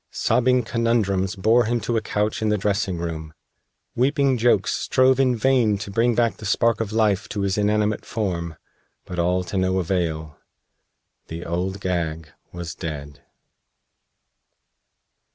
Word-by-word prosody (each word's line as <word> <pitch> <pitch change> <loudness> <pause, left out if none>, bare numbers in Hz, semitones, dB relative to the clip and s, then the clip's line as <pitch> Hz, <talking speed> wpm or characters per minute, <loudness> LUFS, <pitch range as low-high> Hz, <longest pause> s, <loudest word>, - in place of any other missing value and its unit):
Sobbing 125 0 +2
Conundrums 110 -5 0
bore 110 +5 +3
him 120 +2 0
to 115 +3 -2
a 110 - +1
couch 105 +1 -1
in 110 - +1
the 105 - +2
dressing 100 -2 -1
room. 80 -2 -5 0.6
Weeping 135 +1 +2
Jokes 110 -5 +3
strove 130 0 +2
in 130 -2 +3
vain 120 -3 +2
to 100 0 -7
bring 115 +3 +2
back 115 -1 +1
the 110 - -9
spark 115 +2 +2
of 110 -2 -3
life 105 -3 +1
to 105 - -3
his 100 -1 0
inanimate 105 0 +1
form. 85 -6 -3 0.5
But 90 -1 -6
all 90 +2 +1
to 90 +2 -4
no 95 0 +1
avail. 80 -4 -2 0.9
The 85 +1 -7
Old 95 +3 -3
Gag 80 -4 -2 0.2
was 85 -2 -6
dead. 75 -3 -7
100 Hz, 145 wpm, -23 LUFS, 90-115 Hz, 0.9 s, bore